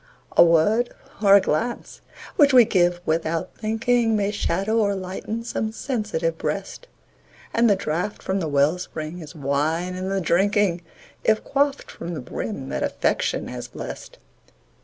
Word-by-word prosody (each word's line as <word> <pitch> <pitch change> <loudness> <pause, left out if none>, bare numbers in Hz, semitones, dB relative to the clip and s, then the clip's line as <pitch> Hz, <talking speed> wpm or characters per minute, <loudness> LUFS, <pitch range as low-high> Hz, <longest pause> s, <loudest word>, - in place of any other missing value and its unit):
A - - +9
word 175 +9 +3 0.3
or 200 -2 +7
a 200 - +7
glance 225 +8 -2 0.3
which 285 -2 +5
we 245 -2 +8
give 175 -4 +2
"without 160 0 -1
thinking", 225 +1 +1
May 205 -1 +1
shadow 205 +2 0
or 200 -2 +2
lighten 190 +4 -5
some 220 -1 -2
sensitive 210 -10 -2
breast; 195 - -4 0.7
And 235 0 +4
the 200 - +5
draught 180 +3 -3
from 190 +1 -1
the 165 - -2
well 145 +4 +2
spring 160 -1 -6
is 160 0 -10
wine 155 +5 -1
in 185 +1 -4
the 195 0 0
drinking, 190 +1 +2 0.4
If 220 0 +2
quaffed 280 0 0
from 170 0 -6
the - - -4
brim 70 - -5
that 70 0 -3
Affection - - 0
has - - -6
blest. - - -8
190 Hz, 155 wpm, -23 LUFS, 165-220 Hz, 0.7 s, A